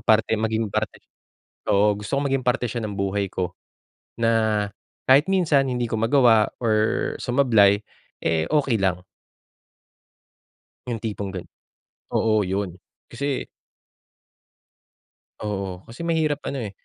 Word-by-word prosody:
parte 110 0 +3
maging 110 0 0
parte - - -1
siya - - -43 0.6
oo, 105 +1 +3
gusto 105 +6 -3
kong 140 0 0
maging 135 -2 0
parte 125 0 +2
siya 120 +2 -3
ng 105 -2 -4
buhay 100 0 0
ko 90 -1 -2 0.7
na 110 -2 +2 0.4
kahit 140 +4 +7
minsan 160 -8 +3
hindi 125 -1 -1
ko - - -5
magawa 115 -3 +4
or 110 -2 +1
sumablay, 110 -6 +4 0.4
eh, 80 -1 +1
okey 140 -6 +2
lang. 90 -1 0 1.8
'Yong 115 -3 -3
tipong 100 -3 -4
gan 90 - -5 0.7
oo, 110 -3 +2
'yon. 95 -1 -2 0.3
Kasi 140 -1 -3 2.0
Oo, 95 -3 -4
kasi 170 +9 -7
mahirap, 155 -3 +1
ano, 135 -4 -3
eh, 100 - -5
110 Hz, 125 wpm, -24 LUFS, 100-130 Hz, 2.0 s, kahit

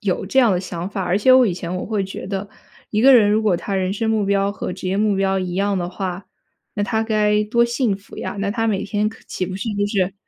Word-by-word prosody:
有 195 -5 -1
这 235 +8 0
样 240 -6 +5
的 180 - 0
想 175 -1 -5
法， 195 -1 -4
而 180 +2 +1
且 255 +5 +5
我 255 -1 +6
以 195 - 0
前 175 0 -5
我 180 - -3
会 210 -3 -1
觉 190 - -7
得， 195 +1 -4 0.4
一 210 - 0
个 270 +3 +7
人 210 -4 +5
如 215 +1 +2
果 205 -5 +2
他 195 +3 -4
人 185 0 0
生 220 +2 -2
目 215 -2 +1
标 200 0 +1
和 205 - -5
职 185 0 -5
业 190 - 0
目 210 -1 +2
标 195 0 +1
一 180 -2 -3
样 200 +1 0
的 175 -1 -2
话， 185 0 -5 0.5
那 205 - -1
他 220 +2 0
该 210 -1 +2
多 235 +2 +2
幸 235 -3 0
福 200 - -15
呀， - - -5
那 200 0 -1
他 225 +1 -1
每 205 -3 0
天 210 +1 0
可 225 - -13
岂 185 - -3
不 185 +1 -5
是 195 +4 -4
就 205 0 0
是 195 -2 0
200 Hz, 300 characters per minute, -20 LUFS, 190-215 Hz, 0.5 s, 个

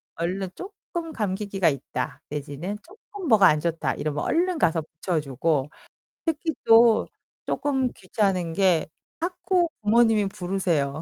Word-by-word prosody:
얼른 180 +3 -2
조금 350 -4 -7
감기기가 195 -3 0
있다 140 0 -4
내지는 150 +7 -5
조금 395 -1 -10
뭐가 210 -6 +7
안 150 0 +4
좋다 160 -5 -1
이러면 150 -1 -3
얼른 355 0 +1
가서 165 - +2
붙여주고. 150 -3 -1 0.6
특히 320 0 -1
또 225 0 +6 0.4
조금 265 -3 0
귀찮은 185 -6 -1
게 180 -6 +3 0.3
자꾸 355 0 0
부모님이 220 -1 +4
부르세요. 175 -7 -1
195 Hz, 270 characters per minute, -25 LUFS, 155-250 Hz, 0.6 s, 뭐가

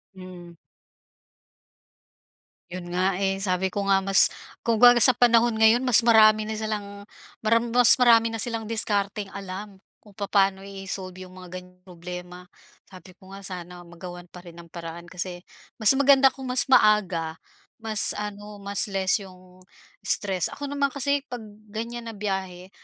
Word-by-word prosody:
Mm. 180 -2 -12 2.1
Yun 175 0 -8
nga, 190 +1 +1
eh, 195 0 -1
sabi 190 -1 -2
ko 200 +1 -4
nga, 195 -1 +2
mas 195 +1 +8 0.4
kung 230 -1 0
ga 245 0 +7
sa 245 +2 +6
panahon 235 -1 +3
ngayon, 220 +3 +3
mas 250 -2 +6
marami 215 -2 +4
na 220 - -4
silang 205 -2 -6 0.4
maram 230 +2 +1
mas 245 0 +6
marami 230 -2 +4
na 225 - -3
silang 230 -2 -4
diskarteng 205 -2 -3
alam 195 +1 -9 0.2
kung 205 -2 -21
papaano 195 -1 0
i-solve 195 -1 -7
yung 185 0 -12
mga 180 0 -10
ganiyang 180 0 -23
problema, 180 0 -10 0.4
sabi 185 -1 -15
ko 190 +1 -20
nga, 195 0 -10
sana 180 -1 -8
magawan 175 +1 -11
pa 180 - -13
rin 170 -1 -15
ng 170 0 -14
paraan 170 0 -9
kasi 175 +1 -7 0.3
mas 220 +3 +6
maganda 275 0 +4
kung 265 - -10
mas 250 - +1
maaga, 190 -10 +2 0.4
mas 220 -2 +1
ano, 210 0 -8
mas 200 +2 0
less 195 0 0
yung 185 -1 -16 0.4
stress. 190 -4 0
Ako 290 - -10
naman 280 0 -1
kasi 280 +1 -1
'pag 245 -1 -8 0.3
ganyan 230 +2 -7
na - - -8
biyahe, 190 -3 -5
200 Hz, 155 wpm, -24 LUFS, 185-225 Hz, 2.1 s, mas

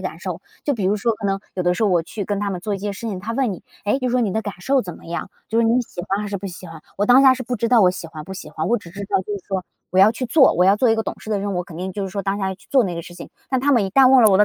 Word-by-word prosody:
感 - - -12
受。 - - -5 0.2
就 285 - 0
比 205 -5 -3
如 200 +3 +2
说 230 +3 +1
可 210 - -4
能 195 0 0
有 180 - -1
的 175 0 +3
时 225 - -2
候 215 - +4
我 175 -2 +3
去 205 +1 -5
跟 205 +1 -2
他 205 0 -1
们 180 -2 -4
做 205 +1 -2
一 - - -4
些 205 +1 -3
事 225 +3 -6
情， 190 -3 -4
他 220 +5 -5
问 250 -3 0
你 180 - -9 0.2
说， 205 - +1
诶， 270 - +2
就 255 - -2
是 - - -2
说 250 - +3
你 205 -5 0
的 220 - 0
感 205 - -5
受 270 +5 +2
怎 175 -3 -7
么 - - -15
样？ 170 +3 -5 0.2
就 225 - 0
是 230 - +3
说 230 - +3
你 250 - +3
喜 200 - -8
欢 195 +2 0
还 210 - -4
是 200 - -3
不 195 - -6
喜 180 0 -8
欢？ 165 -1 -10 0.2
我 205 - +1
当 250 +2 +7
下 260 -1 +7
是 255 - -5
不 245 0 -3
知 230 +2 -1
道 240 -3 +5
我 185 - +6
喜 175 -2 -7
欢 155 -1 -9
不 190 - -8
喜 185 -5 -8
欢。 155 +1 -3
我 240 - +3
只 180 -5 -13
知 195 +4 -9
道 195 -1 +1
就 210 - -6
是 200 - -6
说 190 -2 -2 0.3
我 185 - 0
要 200 +3 +8
去 255 +2 -4
做， 265 +3 +5
我 180 - +3
要 195 +2 +5
做 240 +2 +3
一 225 - +4
个 225 - -1
懂 - - -4
事 220 - -9
的 210 - +1
人， 200 -1 -3
我 180 - -1
肯 170 - -11
定 185 +2 -4
就 205 - -4
是 195 - -3
说 200 +1 -3
当 195 0 -1
下 190 -1 -2
去 190 - -22
做 260 -5 +4
那 180 -2 -3
个 170 - -5
事 175 - -12
情。 - - -10 0.2
但 260 -1 0
他 285 +1 +3
们 230 -6 +3
一 190 - -3
旦 260 +5 +6
问 260 -3 +7
了 210 - +7
我 190 - +5
的 210 - +7
200 Hz, 430 characters per minute, -21 LUFS, 185-230 Hz, 0.3 s, 要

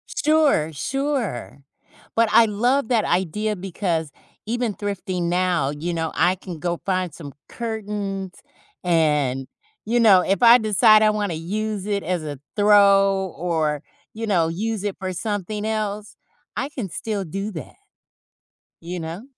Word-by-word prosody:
Sure, 300 - +3
sure, 235 - -3 0.5
but 230 -1 +3
I 230 - +7
love 240 +5 +1
that 230 -4 +3
idea 200 +4 0
because 175 -5 -2 0.3
even 235 0 -1
thrifting 190 -3 -3
now, 175 -5 +1
you 170 +3 -3
know, 160 -1 -2
I 180 +3 +3
can 180 -3 -9
go 175 +1 -2
find 185 -4 -1
some 145 -4 -9 0.2
curtains, 205 -4 -4 0.5
and, 150 -6 +1 0.4
you 240 +2 +1
know, 200 -5 +7
if 195 +4 0
I 235 0 +9
decide 215 0 +5
I 215 - +5
wanna 205 -4 -1
use 205 +4 -3
it 200 -1 -1
as 175 -1 -2
a 145 -3 -6 0.2
throw, 195 -2 +4
or, 160 -3 -1 0.3
you 225 +1 -5
know, 175 -6 +2
use 210 +4 -3
it 200 - -2
for 190 -1 -3
something 210 +1 -3
else, 215 -1 -3 0.4
I 275 - -2
can 245 -10 -5
still 205 +2 -4
do 195 +6 -4
that, 165 - -8 1.0
you 175 +2 -6
know? 165 +5 -6
195 Hz, 145 wpm, -22 LUFS, 170-215 Hz, 1.0 s, I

